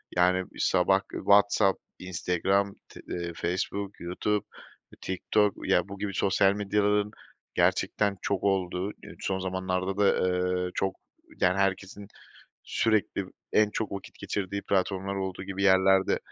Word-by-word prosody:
yani 90 Hz, +1 st, +3 dB
sabah 95 Hz, +2 st, +3 dB
k -, -, -7 dB
WhatsApp, 100 Hz, -1 st, +4 dB, 0.2 s
Instagram, 95 Hz, +2 st, 0 dB
t -, -, -12 dB
eee, 85 Hz, -1 st, -3 dB
Facebook, 95 Hz, +3 st, -3 dB
YouTube, 95 Hz, +4 st, -1 dB, 0.6 s
TikTok, 100 Hz, +2 st, +1 dB, 0.2 s
ya -, -, +3 dB
bu 100 Hz, 0 st, -8 dB
gibi 100 Hz, -1 st, -3 dB
sosyal 95 Hz, +1 st, +3 dB
medyaların 105 Hz, 0 st, +1 dB, 0.4 s
gerçekten 100 Hz, -2 st, +1 dB
çok 100 Hz, -2 st, -1 dB
olduğu, 95 Hz, 0 st, 0 dB
eee, -, -, -13 dB
son 95 Hz, -1 st, -2 dB
zamanlarda 95 Hz, +1 st, -2 dB
da, 100 Hz, -2 st, +3 dB, 0.4 s
eee, 90 Hz, -, -4 dB
çok, 95 Hz, 0 st, -1 dB, 0.5 s
yani 90 Hz, +1 st, +3 dB
herkesin 100 Hz, +1 st, -1 dB, 0.6 s
sürekli 110 Hz, -3 st, +1 dB, 0.3 s
en 105 Hz, -1 st, +4 dB
çok 110 Hz, -2 st, -3 dB
vakit 100 Hz, -, -7 dB
geçirdiği 100 Hz, 0 st, -3 dB
platformlar 95 Hz, 0 st, 0 dB
olduğu 95 Hz, -1 st, -4 dB
gibi 95 Hz, 0 st, -4 dB
yerlerde, 95 Hz, 0 st, +4 dB
95 Hz, 130 wpm, -28 LUFS, 95-100 Hz, 0.6 s, WhatsApp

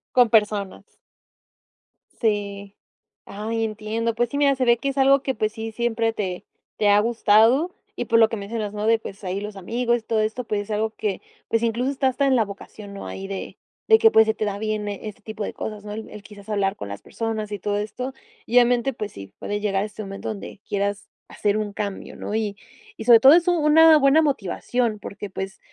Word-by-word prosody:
Con 245 Hz, -2 st, +6 dB
personas. 210 Hz, -3 st, 0 dB, 1.2 s
Sí, 200 Hz, -2 st, -2 dB, 0.5 s
ah 210 Hz, +2 st, -6 dB
entiendo, 225 Hz, +1 st, -2 dB
pues, 240 Hz, 0 st, 0 dB
sí, 285 Hz, -, -3 dB
mira, 280 Hz, -1 st, +4 dB
se 255 Hz, -1 st, 0 dB
ve 235 Hz, 0 st, +5 dB
que 275 Hz, +4 st, -2 dB
es 275 Hz, -, -5 dB
algo 275 Hz, 0 st, +5 dB
que, 265 Hz, -1 st, -2 dB
pues, 215 Hz, 0 st, 0 dB
sí 225 Hz, -1 st, -5 dB
siempre 225 Hz, 0 st, 0 dB
te 185 Hz, -4 st, -4 dB, 0.3 s
te 205 Hz, -1 st, +3 dB
ha 205 Hz, 0 st, +6 dB
gustado 230 Hz, -, +3 dB, 0.2 s
y -, -, -3 dB
por 230 Hz, -1 st, +3 dB
lo 225 Hz, -, +6 dB
que 225 Hz, -, -3 dB
mencionas 210 Hz, +1 st, -4 dB
¿no? 210 Hz, 0 st, -3 dB
de, 225 Hz, 0 st, +4 dB
pues, 200 Hz, -1 st, -10 dB
ahí 185 Hz, +2 st, -2 dB
los 210 Hz, 0 st, -6 dB
amigos 235 Hz, +5 st, 0 dB
y -, -, -17 dB
todo 225 Hz, -1 st, 0 dB
esto, 220 Hz, +4 st, -2 dB
pues, 210 Hz, -2 st, -2 dB
es 210 Hz, +1 st, -8 dB
algo 220 Hz, +1 st, 0 dB
que, 210 Hz, -3 st, -3 dB, 0.3 s
pues, 230 Hz, 0 st, 0 dB
incluso 235 Hz, +3 st, 0 dB
está 270 Hz, -1 st, 0 dB
hasta 275 Hz, +2 st, +1 dB
en 265 Hz, -, +4 dB
la 225 Hz, -3 st, +3 dB
vocación, 200 Hz, 0 st, -10 dB
¿no? 200 Hz, -, -7 dB
ahí 195 Hz, 0 st, -6 dB
de 195 Hz, -1 st, -6 dB, 0.3 s
de 445 Hz, 0 st, +7 dB
que, 445 Hz, -, +6 dB
pues, 220 Hz, -, +6 dB
se 220 Hz, -, +2 dB
te -, -, -4 dB
da 200 Hz, -1 st, -2 dB
bien 215 Hz, -1 st, -2 dB
este 210 Hz, +2 st, -7 dB
tipo 215 Hz, 0 st, -6 dB
de -, -, -4 dB
cosas 210 Hz, -1 st, -6 dB
¿no? 210 Hz, -, -6 dB
el 220 Hz, +1 st, -7 dB
el 210 Hz, -, -10 dB
quizás 205 Hz, 0 st, -14 dB
hablar 200 Hz, -1 st, 0 dB
con 100 Hz, -, -7 dB
las 100 Hz, -, -7 dB
personas 220 Hz, -2 st, -4 dB
y 205 Hz, -, -4 dB
todo 205 Hz, +2 st, -1 dB
esto 250 Hz, +5 st, -4 dB, 0.3 s
y 240 Hz, -, -4 dB
obviamente, 245 Hz, +1 st, +4 dB
pues, 210 Hz, -2 st, -5 dB
sí 100 Hz, 0 st, -11 dB
puede 205 Hz, 0 st, -3 dB
llegar 195 Hz, -1 st, 0 dB
a -, -, -2 dB
este 215 Hz, 0 st, -8 dB
momento 195 Hz, 0 st, -6 dB
donde 210 Hz, -1 st, -7 dB
quieras 200 Hz, 0 st, -2 dB, 0.2 s
hacer 210 Hz, 0 st, 0 dB
un 210 Hz, -1 st, -3 dB
cambio 200 Hz, -2 st, -5 dB
¿no? 210 Hz, -, -5 dB
y 210 Hz, -2 st, -2 dB, 0.4 s
y -, -, -6 dB
sobre 235 Hz, -2 st, +8 dB
todo 270 Hz, +5 st, +8 dB
es 345 Hz, +1 st, +4 dB
una 350 Hz, -3 st, +2 dB, 0.3 s
una 315 Hz, -, +8 dB
buena 285 Hz, +2 st, +5 dB
motivación 240 Hz, -, -1 dB
porque, 205 Hz, +1 st, -7 dB
pues, 190 Hz, +1 st, -6 dB
215 Hz, 225 wpm, -23 LUFS, 205-235 Hz, 1.2 s, sobre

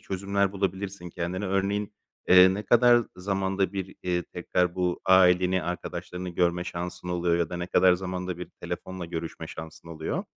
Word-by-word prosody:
çözümler 100 Hz, +1 st, -1 dB
bulabilirsin 95 Hz, -2 st, -3 dB
kendine: 90 Hz, +4 st, -3 dB
Örneğin, 100 Hz, +2 st, -1 dB, 0.4 s
eee, 95 Hz, +1 st, +8 dB
ne 105 Hz, -, -3 dB
kadar 120 Hz, +2 st, +5 dB
zamanda 95 Hz, 0 st, -1 dB
bir, 95 Hz, -1 st, -5 dB
eee, 90 Hz, -1 st, 0 dB
tekrar 90 Hz, 0 st, -1 dB
bu 90 Hz, -1 st, -1 dB
aileni, 90 Hz, -1 st, +5 dB
arkadaşlarını 90 Hz, +1 st, -5 dB
görme 90 Hz, 0 st, 0 dB
şansın 90 Hz, 0 st, -5 dB
oluyor 85 Hz, -1 st, +1 dB
ya 85 Hz, -2 st, -1 dB
da 90 Hz, -, -4 dB
ne 90 Hz, -, -4 dB
kadar 90 Hz, 0 st, +5 dB
zamanda 90 Hz, -1 st, -4 dB
bir 90 Hz, -, -7 dB
telefonla 95 Hz, -1 st, -5 dB
görüşme 80 Hz, -1 st, -5 dB
şansın 80 Hz, +1 st, -10 dB
oluyor? 80 Hz, -1 st, -4 dB
90 Hz, 155 wpm, -27 LUFS, 90-95 Hz, 0.4 s, eee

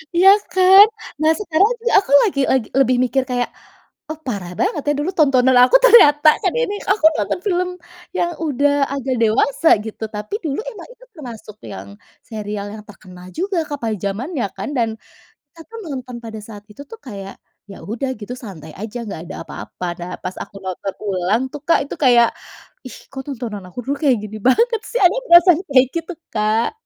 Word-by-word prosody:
Iya 375 Hz, +3 st, +7 dB, 0.2 s
kan. 380 Hz, +2 st, +8 dB, 0.4 s
Nah 315 Hz, -, +4 dB
sekarang 395 Hz, +2 st, +2 dB
sih -, -, +1 dB
aku 380 Hz, -, -7 dB
lagi 375 Hz, -10 st, -1 dB
lagi 260 Hz, -5 st, 0 dB
lebih 255 Hz, -2 st, +3 dB
mikir 260 Hz, +1 st, 0 dB
kayak, 245 Hz, -1 st, -1 dB, 0.6 s
oh 310 Hz, -, -5 dB
parah 195 Hz, -7 st, -4 dB
banget 300 Hz, -, 0 dB
ya 295 Hz, -, +3 dB
dulu 340 Hz, +6 st, -1 dB
tontonan 260 Hz, -4 st, +4 dB
aku 250 Hz, -, +4 dB
ternyata 305 Hz, -11 st, +7 dB
kan 370 Hz, -, +1 dB
ini 485 Hz, -4 st, -1 dB, 0.2 s
aku 400 Hz, -6 st, +1 dB
nonton 210 Hz, -, -2 dB
film 360 Hz, -1 st, 0 dB, 0.5 s
yang 345 Hz, -1 st, 0 dB
udah 290 Hz, -2 st, +1 dB, 0.2 s
agak 270 Hz, -2 st, -2 dB
dewasa 265 Hz, +8 st, +1 dB, 0.2 s
gitu, 220 Hz, 0 st, -8 dB
tapi 210 Hz, -, -5 dB
dulu 285 Hz, +3 st, -2 dB
emang -, -, -9 dB
itu -, -, -21 dB
termasuk 235 Hz, -, -10 dB, 0.2 s
yang 95 Hz, +1 st, -9 dB, 0.4 s
serial 210 Hz, -3 st, -6 dB
yang 215 Hz, -1 st, -10 dB
terkenal 180 Hz, -3 st, -14 dB
juga 380 Hz, +3 st, -2 dB
Kak 290 Hz, -1 st, -5 dB
pada 220 Hz, -2 st, -1 dB
zamannya 240 Hz, -, -3 dB
kan, 195 Hz, +6 st, -5 dB
dan 230 Hz, -2 st, +1 dB, 0.6 s
kita 330 Hz, -, -15 dB
pun 455 Hz, 0 st, -9 dB
nonton 255 Hz, -2 st, -6 dB
pada 220 Hz, -1 st, -7 dB
saat 205 Hz, -2 st, -11 dB
itu 210 Hz, -, -12 dB
tuh 455 Hz, -, -10 dB
kayak 195 Hz, -4 st, -8 dB, 0.4 s
ya -, -, -10 dB
udah 240 Hz, +5 st, -4 dB
gitu 225 Hz, +3 st, -7 dB
santai 160 Hz, -8 st, -10 dB
aja 220 Hz, +3 st, -6 dB
nggak 165 Hz, -6 st, -6 dB
ada 190 Hz, -, -8 dB
apa-apa, 180 Hz, -, -8 dB
nah 175 Hz, +1 st, -6 dB
pas 185 Hz, -, -5 dB
aku -, -, -18 dB
nonton 190 Hz, +1 st, -5 dB
ulang 195 Hz, +4 st, 0 dB
tuh 295 Hz, -1 st, -8 dB
Kak 335 Hz, -, +4 dB
itu -, -, -6 dB
kayak, 240 Hz, -4 st, +5 dB, 0.6 s
ih -, -, -11 dB
kok 265 Hz, -1 st, -6 dB
tontonan 230 Hz, -7 st, -6 dB
aku 180 Hz, -, -10 dB
dulu 280 Hz, +3 st, -2 dB
kayak 265 Hz, -5 st, +4 dB
gini 215 Hz, +1 st, -7 dB
banget 460 Hz, -, +3 dB
sih, -, -, -2 dB
ada 360 Hz, +2 st, +5 dB
perasaan 345 Hz, -1 st, +7 dB
kayak 265 Hz, -2 st, +5 dB
gitu 335 Hz, +2 st, -4 dB, 0.2 s
Kak. 215 Hz, +1 st, 0 dB
255 Hz, 185 wpm, -19 LUFS, 210-330 Hz, 0.6 s, kan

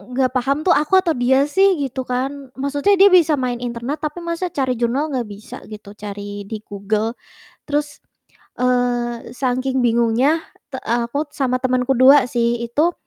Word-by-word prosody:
nggak 260 Hz, -2 st, +2 dB
paham 275 Hz, +4 st, 0 dB
tuh 360 Hz, -, +4 dB
aku 300 Hz, +6 st, +3 dB
atau 330 Hz, -, +1 dB
dia 265 Hz, +3 st, +2 dB
sih 385 Hz, +6 st, +3 dB
gitu 270 Hz, -2 st, -3 dB
kan. 270 Hz, +2 st, -3 dB
Maksudnya 285 Hz, +9 st, +1 dB
dia 395 Hz, +1 st, +7 dB
bisa 330 Hz, -4 st, +5 dB
main 250 Hz, -2 st, -2 dB
internet 245 Hz, +4 st, -4 dB
tapi 305 Hz, +3 st, -4 dB
masa 340 Hz, +2 st, -2 dB
cari 265 Hz, -5 st, -1 dB
jurnal 265 Hz, +6 st, 0 dB
nggak 245 Hz, -4 st, -2 dB
bisa 205 Hz, +1 st, -10 dB
gitu, 210 Hz, -1 st, -10 dB
cari 205 Hz, -1 st, -7 dB
di 220 Hz, -, -5 dB
Google. 210 Hz, +3 st, -2 dB, 0.5 s
Terus, 295 Hz, 0 st, -2 dB, 0.6 s
eee, 245 Hz, -1 st, 0 dB
sangking 255 Hz, +1 st, -1 dB
bingungnya 240 Hz, +6 st, +2 dB, 0.3 s
te 265 Hz, -, -6 dB
aku 240 Hz, +6 st, -1 dB
sama 255 Hz, -2 st, 0 dB
temen 255 Hz, -1 st, +1 dB
ku 270 Hz, -, +3 dB
2 260 Hz, +1 st, +7 dB
sih 235 Hz, 0 st, 0 dB
itu, 300 Hz, +9 st, +1 dB
255 Hz, 165 wpm, -20 LUFS, 235-290 Hz, 0.6 s, dia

